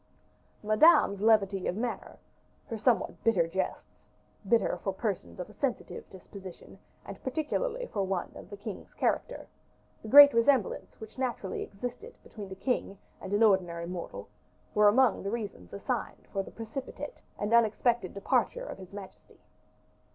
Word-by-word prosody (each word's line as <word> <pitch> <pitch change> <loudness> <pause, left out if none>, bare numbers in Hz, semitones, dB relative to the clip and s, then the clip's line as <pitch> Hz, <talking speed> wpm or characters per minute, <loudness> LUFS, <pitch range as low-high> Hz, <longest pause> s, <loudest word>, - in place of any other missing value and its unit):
Madame's 215 - +5
levity 205 -3 +3
of - - -1
manner, 240 +1 -4 0.5
her 230 - -5
somewhat 225 +2 0
bitter 210 -7 +3
jests, 190 +3 -4 0.5
bitter 225 -6 +3
for 195 - 0
persons 195 -1 -4
of 180 - -4
a 210 - -15
sensitive 265 -1 -3
disposition, 190 -1 -12 0.3
and - - -9
particularly 455 - -2
for 205 - -3
one 190 -2 -2
of - - -11
the 205 - -8
king's 205 0 -8
character; - - -1 0.6
the - - -9
great 285 +4 +10
resemblance 230 -1 +1
which 220 +3 -11
naturally 240 -7 -2
existed 245 - -7
between 205 -3 -9
the 190 - -7
king 200 -2 -2 0.2
and 190 - -7
an 205 +2 +3
ordinary 175 -5 +2
mortal, 175 0 -6 0.5
were 210 -1 +5
among 235 +1 +4
the 195 - -3
reasons 205 - -5
assigned - - -4
for 195 - 0
the - - -9
precipitate 240 - -7 0.2
and 205 +2 -2
unexpected 235 -2 +3
departure - - 0
of - - -8
his 185 -1 -11
majesty. 200 -1 -11
210 Hz, 150 wpm, -30 LUFS, 195-245 Hz, 0.6 s, great